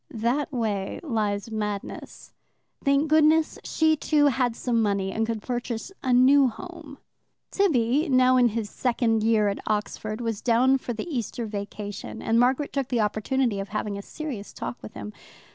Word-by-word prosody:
That 240 +7 -1
way 215 -6 -2
lies 215 - -2
madness. 210 -2 -5 0.5
Thank 280 +2 +3
goodness 310 +1 +3
she, 315 0 +2
too, 295 0 +2
had 245 -2 0
some 235 -2 0
money, 200 -2 0
and 225 +2 -1
could 225 -2 -3
purchase 245 +4 -4
a 260 - -1
new 260 +3 +6
home. 315 +2 -9 0.5
Tibby, 295 - +2
now 255 -1 +5
in 250 -1 +5
his 225 -1 -2
second 230 -1 0
year 215 -1 +3
at 200 - -1
Oxford, 215 +1 -2
was 225 -3 -3
down 255 +3 +3
for 245 - -4
the 225 - -5
Easter 240 - -3
vacation, 205 -1 -6
and 225 +1 +1
Margaret 260 +4 +2
took 275 -3 -1
the 245 -3 0
opportunity 215 +1 0
of 195 - -5
having 210 -1 -3
a 200 - -5
serious 255 -4 -7
talk 120 - -6
with 105 - -10
him. 105 +1 -7
235 Hz, 165 wpm, -25 LUFS, 215-270 Hz, 0.5 s, new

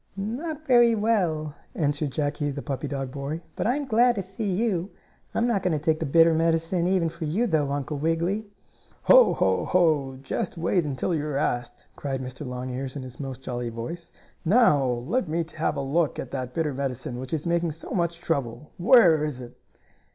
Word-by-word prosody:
"Not 290 +10 -4
very 240 -3 +5
well," 180 -9 0 0.2
answered 145 -1 0
Jackie, 145 +1 -1
the 140 0 -5
puppy 140 0 -3
dog 135 -2 -4
boy. 140 +4 -4 0.2
"But - - -1
I'm 280 +4 0
glad 240 0 +4
to 195 - -2
see 195 +3 -4
you. 190 -2 0 0.5
I'm 230 - +2
not 230 -5 +1
going 175 -4 +1
to 150 - -9
take 160 -1 +2
the 160 - -2
bitter 165 +3 +5
medicine 165 +2 +1
even 185 -3 +2
for 165 0 -5
you, 185 +11 +1
though, 155 -9 +1
Uncle 145 +1 -3
Wiggily." 170 +7 0 0.6
"Ho! - - +7
Ho! - - +2
Ho! 155 -7 +2
Just 180 +5 -3
you 165 - -6
wait 175 -1 +2
until 145 +5 -1
you're 150 -3 -1
asked!" 120 -2 -2
cried 135 -2 -3
Mr. 130 +3 -6
Longears 130 +1 -5
in 140 - -5
his 125 -1 -9
most 135 -2 -6
jolly 120 -1 -3
voice. 120 +10 -6 0.3
"Now 175 - +4
let 130 - -1
me 165 +2 -1
have 155 - 0
a - - -1
look 145 +3 0
at 125 - -6
that 130 -2 -4
bitter 155 -3 0
medicine 130 -2 -3
which 130 0 -6
is 155 -2 -2
making 170 -1 0
so 160 - -9
much 170 -2 0
trouble. 140 -4 -3
Where 175 - +6
is 150 -4 -3
it?" 120 -1 -10
160 Hz, 195 wpm, -26 LUFS, 135-185 Hz, 0.6 s, Ho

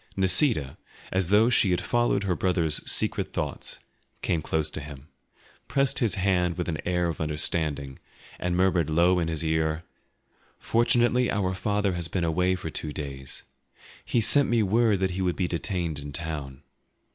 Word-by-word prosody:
Nisida, 95 - +3 0.3
as 95 -2 +1
though 110 +4 +4
she 115 -5 +4
had 90 -1 +1
followed 120 +2 +1
her 95 -3 0
brother's 85 -5 +1
secret - - +1
thoughts, - - -4 0.4
came 80 - 0
close 80 0 0
to - - -6
him, 70 +1 -11 0.6
pressed 135 +1 +1
his 115 -3 +1
hand 90 -3 +1
with 90 - -3
an 80 -2 -3
air 90 -1 +1
of 85 -2 -4
understanding, 75 -3 -2 0.4
and 90 0 -1
murmured 90 -4 +2
low 85 +3 +3
in 85 - -1
his 80 -1 -2
ear, 80 0 0 0.7
"Fortunately 120 +1 +2
our 95 -2 0
father 100 +1 0
has 85 -1 -2
been 85 +1 -2
away 90 +3 +1
for 80 -3 -6
two 75 - -3
days; 70 -3 -7 0.6
he 120 - 0
sent 140 +6 +3
me 115 -2 +3
word 105 -1 +2
that 95 -1 +1
he 95 +2 -3
would 90 -2 0
be 90 - -1
detained 85 -3 -3
in 70 0 -7
town. 75 -4 -6
90 Hz, 170 wpm, -26 LUFS, 80-100 Hz, 0.7 s, though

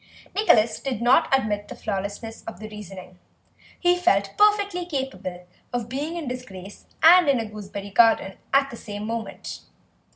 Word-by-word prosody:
Nicholas 225 - +3
did 265 -6 -3
not 255 +7 +4
admit 210 -6 +1
the - - -8
flawlessness 205 +3 -5
of 225 - -7
the 215 - -7
reasoning; 190 -3 -10 0.6
he 355 0 +4
felt 200 - +2
perfectly 410 -3 +3
capable 265 - -5 0.3
of 240 -2 -3
being 290 +6 -3
in 320 -5 -5
disgrace 205 -6 -8 0.2
and 345 -1 +8
in 270 -3 +3
a 225 - -2
gooseberry 205 -1 -8
garden 220 -2 +4 0.2
at 275 0 +3
the 235 - -8
same 205 -1 -7
moment. 230 0 -5
230 Hz, 155 wpm, -24 LUFS, 205-280 Hz, 0.6 s, and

